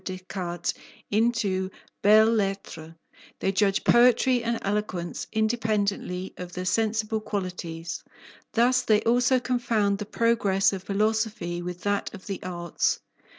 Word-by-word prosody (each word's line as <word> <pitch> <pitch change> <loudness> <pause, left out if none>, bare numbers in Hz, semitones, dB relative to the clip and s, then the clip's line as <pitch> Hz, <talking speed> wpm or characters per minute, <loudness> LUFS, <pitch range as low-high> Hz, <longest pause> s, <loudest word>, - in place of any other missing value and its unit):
Descartes 185 -2 -4 0.4
into 210 -4 +1 0.3
belles 220 +2 +6
lettres; 195 -6 -3 0.5
they 195 - +1
judge 195 0 +2
poetry 245 +1 +4
and 235 0 0
eloquence 195 -4 -2
independently 215 -4 -1
of 180 -1 -7
their 180 0 -4
sensible 220 +2 0
qualities. 180 -5 -5 0.5
Thus 250 +2 +4
they 215 -3 +3
also 245 +2 +3
confound 225 -5 0
the 210 - -5
progress 210 -5 +2
of 190 - -4
philosophy 210 -3 -1
with 180 0 -6
that 205 0 -1
of 190 - -12
the 195 -2 -5
arts. 175 -2 -1
205 Hz, 120 wpm, -26 LUFS, 185-225 Hz, 0.5 s, belles